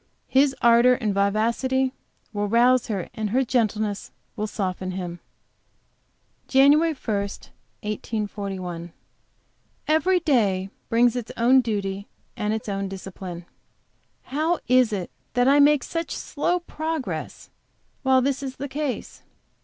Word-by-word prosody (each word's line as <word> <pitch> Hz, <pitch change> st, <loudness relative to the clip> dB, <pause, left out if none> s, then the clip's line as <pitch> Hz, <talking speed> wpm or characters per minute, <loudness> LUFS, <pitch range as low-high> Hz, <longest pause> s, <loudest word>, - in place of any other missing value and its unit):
His 270 Hz, +1 st, +3 dB
ardor 235 Hz, +2 st, +6 dB
and 215 Hz, -5 st, -1 dB
vivacity 235 Hz, +6 st, +1 dB, 0.4 s
will 205 Hz, 0 st, -1 dB
rouse 240 Hz, +3 st, +4 dB
her, 195 Hz, -5 st, -3 dB
and 220 Hz, -3 st, -3 dB
her 260 Hz, +5 st, +2 dB
gentleness 215 Hz, -4 st, 0 dB, 0.3 s
will 215 Hz, -1 st, -2 dB
soften 185 Hz, -2 st, -3 dB
him. 175 Hz, -2 st, -5 dB, 1.3 s
JAN. 270 Hz, +1 st, +6 dB
1, 325 Hz, -2 st, 0 dB
1841. 200 Hz, -4 st, -5 dB, 0.9 s
Every 320 Hz, +5 st, +3 dB
day 205 Hz, -, +1 dB, 0.2 s
brings 235 Hz, +1 st, +4 dB
its 245 Hz, -3 st, -4 dB
own 255 Hz, +3 st, +5 dB
duty 200 Hz, -3 st, -3 dB, 0.3 s
and 210 Hz, 0 st, -1 dB
its 220 Hz, 0 st, -3 dB
own 195 Hz, -1 st, -2 dB
discipline. 185 Hz, -2 st, -8 dB, 0.8 s
How 315 Hz, +5 st, 0 dB
is 250 Hz, -2 st, +4 dB
it 190 Hz, -4 st, -3 dB, 0.2 s
that 245 Hz, 0 st, +3 dB
I 280 Hz, +2 st, +6 dB
make 290 Hz, 0 st, +5 dB
such 330 Hz, -1 st, -3 dB
slow 350 Hz, +4 st, -1 dB
progress 315 Hz, -4 st, -5 dB, 0.5 s
while 260 Hz, -1 st, +4 dB
this 275 Hz, +1 st, 0 dB
is 265 Hz, -1 st, -5 dB
the 280 Hz, -, -5 dB
case? 285 Hz, -1 st, -4 dB
235 Hz, 120 wpm, -24 LUFS, 200-265 Hz, 1.3 s, ardor